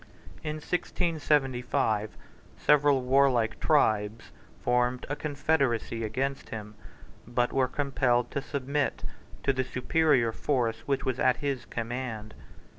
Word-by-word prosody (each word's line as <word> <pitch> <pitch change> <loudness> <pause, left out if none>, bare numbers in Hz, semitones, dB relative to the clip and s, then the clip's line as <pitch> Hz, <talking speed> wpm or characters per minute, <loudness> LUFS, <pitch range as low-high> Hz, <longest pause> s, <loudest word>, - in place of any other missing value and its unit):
In 150 - -3
1675, 140 - 0 0.4
several 145 -3 +4
warlike 125 -4 +3
tribes 110 -8 +1 0.3
formed 125 0 +1
a 145 - -1
confederacy 140 -7 0
against 135 +6 -2
him, 105 -1 -7 0.5
but 120 0 0
were 130 -1 +3
compelled 125 -3 +1
to 140 - -2
submit 140 +1 -2 0.4
to 135 - +2
the 130 0 0
superior 130 -2 +2
force 120 -2 0
which 140 -1 0
was 130 -1 -1
at 130 - +3
his 140 -4 -2
command. 115 -2 -5
130 Hz, 115 wpm, -28 LUFS, 115-140 Hz, 0.5 s, several